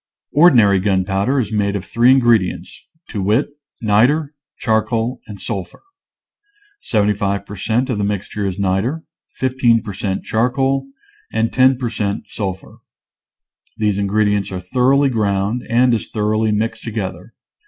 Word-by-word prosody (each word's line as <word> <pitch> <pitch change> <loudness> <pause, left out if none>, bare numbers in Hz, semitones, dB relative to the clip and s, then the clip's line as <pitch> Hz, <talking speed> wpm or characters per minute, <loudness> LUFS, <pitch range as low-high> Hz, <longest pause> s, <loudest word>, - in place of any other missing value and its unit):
Ordinary 120 - +5
gunpowder 95 +6 0
is 110 -4 -2
made 100 -1 0
of 95 -2 -4
three 120 +2 +3
in 135 +1 +6
gredients, 115 -7 +1 0.3
to 100 - -4
wit: 105 +8 +1 0.3
niter, 130 +9 +2 0.2
charcoal, 115 +2 0
and 105 -2 -9
sul 95 0 -3
phur. - - -20 1.0
Seventy 105 - +1
five 100 -1 -2
per 105 - -9
cent, 110 +6 0
of 125 -6 -2
the - - 0
mixture 105 +1 -3
is 95 -1 -2
niter, 100 +11 -1 0.3
15 125 -3 +2
per 105 -3 -6
cent, 95 0 -3
charcoal, 130 - 0 0.4
and 115 +1 0
10 130 0 +4
per 120 -3 -3
cent, 100 -2 -2
sulphur. 95 -3 -5 1.0
These 105 -3 0
ingredients 105 0 +1
are 95 - -4
thoroughly 130 +9 +2
ground 105 0 0
and 120 +1 +3
as 110 - -1
thoroughly 110 0 0
mixed 110 +1 -2
together. 100 -3 -5
110 Hz, 145 wpm, -18 LUFS, 100-120 Hz, 1.0 s, in